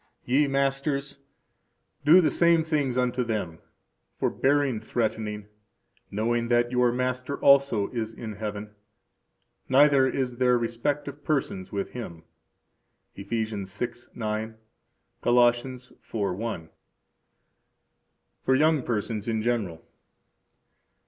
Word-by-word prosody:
Ye 140 +4 +3
masters, 140 0 -1 0.8
do 165 +6 +7
the 160 - +2
same 170 -1 +4
things 145 -6 0
unto 125 0 +1
them, 105 -8 -3 0.6
forbearing 140 -4 +1
threatening, 110 -2 -2 0.6
knowing 115 +3 0
that 120 0 +2
your 125 -1 +3
Master 125 +2 -2
also 140 -7 +4
is 115 -3 -3
in 110 -1 -7
heaven; 105 -1 -5 1.0
neither 135 0 +5
is 130 -2 -2
there 125 -1 +3
respect 120 +5 -2
of 145 +1 -8
persons 130 -11 -2
with 100 -1 -3
Him. 85 -10 -8 0.9
Eph. 100 0 -9
6:9; 110 0 -4 0.7
Col. 120 - +2
4:1. 120 -6 -1 1.7
For 130 - +3
Young 155 +1 +3
Persons 110 -2 -3
in 110 -1 -1
General. 105 -9 -2
120 Hz, 100 wpm, -26 LUFS, 110-135 Hz, 1.7 s, do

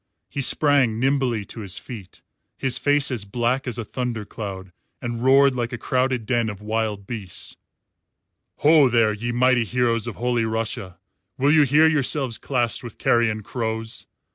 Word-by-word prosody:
He 140 - -2
sprang 135 -5 +3
nimbly 130 -5 +1
to 115 - -9
his 100 -4 -5
feet, 105 -7 -10 0.3
his 130 -3 0
face 145 -1 +2
as 120 -5 -2
black 120 +6 -1
as 120 -2 -2
a 115 - -4
thunder 120 -2 -4
cloud, 95 -3 -7 0.3
and 120 -1 -4
roared 135 +1 +5
like 120 -1 -2
a 120 - -4
crowded 125 -1 0
den 120 -1 0
of 105 -2 -7
wild 105 -1 -2
beasts: 100 -5 -6 1.1
"Ho, 150 -3 +6
there, 115 -2 +3
ye 120 +3 -3
mighty 125 0 +3
heroes 115 0 0
of 115 - -5
Holy 120 0 0
Russia! 110 -5 -3 0.4
Will 140 +2 +3
you 155 0 +6
hear 150 +4 +5
yourselves 140 -5 +1
classed 120 -4 -1
with 120 -3 -9
carrion 110 -2 +1
crows? 115 0 -3
120 Hz, 165 wpm, -23 LUFS, 110-130 Hz, 1.1 s, Ho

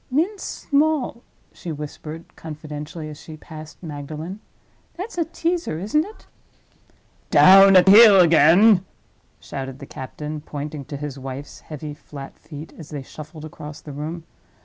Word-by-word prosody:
"Mince 340 +10 0
small," 290 -4 0 0.3
she 170 - -7
whispered, 150 +2 -8
confidentially, 155 0 -7
as 150 -1 -10
she 155 -1 -10
passed 155 +1 -11
Magdalen. 155 +5 -6 0.6
"That's 385 +6 -6
a 335 -2 0
teaser, 335 - -2
isn't 215 - +1
it?" 420 +5 -13 1.0
"Down 195 +1 +8
at 185 0 +7
heel 205 0 +9
again!" 180 +4 +6 0.6
shouted 135 -1 -6
the 140 - -9
captain, 150 +3 -7
pointing 145 -1 -6
to 145 - -6
his 140 -1 -6
wife's 135 +2 -7
heavy 150 -1 -8
flat 140 -2 -11
feet 150 0 -10
as 160 - -10
they 145 -3 -6
shuffled 155 +3 -10
across 150 -1 -9
the 150 -2 -10
room. 155 +4 -5
155 Hz, 140 wpm, -22 LUFS, 150-195 Hz, 1.0 s, heel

